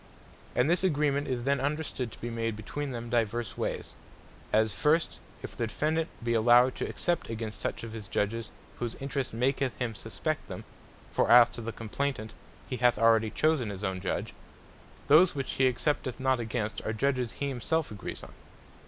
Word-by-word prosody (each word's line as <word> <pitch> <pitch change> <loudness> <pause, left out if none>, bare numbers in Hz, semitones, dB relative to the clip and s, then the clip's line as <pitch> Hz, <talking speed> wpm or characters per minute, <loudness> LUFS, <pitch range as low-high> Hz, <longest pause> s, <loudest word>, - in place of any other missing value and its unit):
And 125 - +3
this 175 +3 +2
agreement 145 -4 +2
is 125 -3 -2
then 140 +1 +2
understood 140 -4 -2
to - - -12
be 120 - -3
made 115 -1 -1
between 140 +7 -4
them 120 -2 -5
divers 115 -1 0
wayes; - - -3 0.6
as 110 -1 +3
first, 150 - +2 0.2
if - - -7
the 115 - -1
Defendant 160 +7 0
be 120 0 +1
allowed 120 +3 +6
to - - -2
except 175 -1 -1
against 110 -1 -5
such - - -3
of 115 -1 -6
his 110 -3 -7
Judges, 115 +3 -1 0.3
whose 120 -1 -3
interest 135 -1 -3
maketh 130 +2 0
him 120 -3 -2
suspect - - -3
them, - - -7 0.5
(for - - +1
as 120 0 +8
to - - -6
the 115 0 -4
Complaynant 115 0 -3 0.4
he 125 - -3
hath 120 -1 +4
already 115 0 +4
chosen 150 -3 +1
his 100 0 -6
own 95 -2 -2
Judge,) 95 - -2 0.7
those 160 +4 +6
which 135 -2 -2
he 130 - +3
excepteth 130 -1 -1
not 130 -1 +2
against, 110 -2 -3
are 110 - -2
Judges 125 0 0
he 140 - -2
himself 150 +4 -1
agrees 105 - -6
on. - - -11
120 Hz, 180 wpm, -29 LUFS, 115-140 Hz, 0.7 s, as